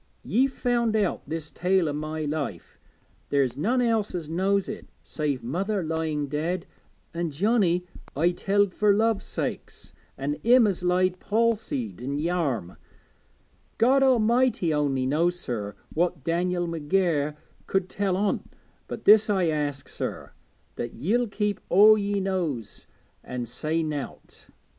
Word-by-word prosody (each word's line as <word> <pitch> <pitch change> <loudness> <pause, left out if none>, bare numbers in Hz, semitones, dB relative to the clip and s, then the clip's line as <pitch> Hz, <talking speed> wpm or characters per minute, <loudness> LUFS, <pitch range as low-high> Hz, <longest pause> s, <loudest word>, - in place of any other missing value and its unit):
Ye've 265 +4 +2
found 240 -3 0
out 205 -4 +1
this 160 -1 -5
tale 180 -1 +1
o' 145 - -1
my 155 +1 -3
life; 145 - -4 0.5
there's 135 -3 +1
none 245 - +1
else 225 -5 0
as 165 -4 -4
knows 190 +4 +1
it, - - -7 0.2
save 145 -5 -3
mother 190 - -1
lying 160 -2 -1
dead, 165 +6 -2 0.5
an' 170 0 -2
Johnnie 180 +1 +1 0.3
I 165 +5 +3
telled 195 +2 +1
fur 210 -1 +3
love's 220 0 +1
sake, - - -3 0.5
an' 145 +2 -2
him 245 +1 +6
as 195 -4 -1
lies 180 +1 +3
palsied 210 - -1
i' - - -6
Yarm 150 - -1 1.0
God 265 +4 +4
A'mighty 240 -7 +3
only 140 -3 0
knows, 170 +6 +1
sir, 105 - -4 0.2
what 170 -3 0
Dan'el 175 +1 0
McGair 160 -2 0 0.3
could 190 -1 0
tell 195 -1 -1
on't 200 0 -1 0.4
but - - -7
this 215 +1 +7
I 190 -5 +2
ask, 145 -3 -2
sir, - - -5 0.5
that 120 - -4
ye'll 235 +9 +1
keep 210 -1 -2
all 210 +3 +8
ye 205 -1 -1
knows 170 - -3 0.4
an' 125 -1 -4
say 155 +7 -2
nowt. 150 -3 -6
175 Hz, 140 wpm, -26 LUFS, 150-205 Hz, 1.0 s, all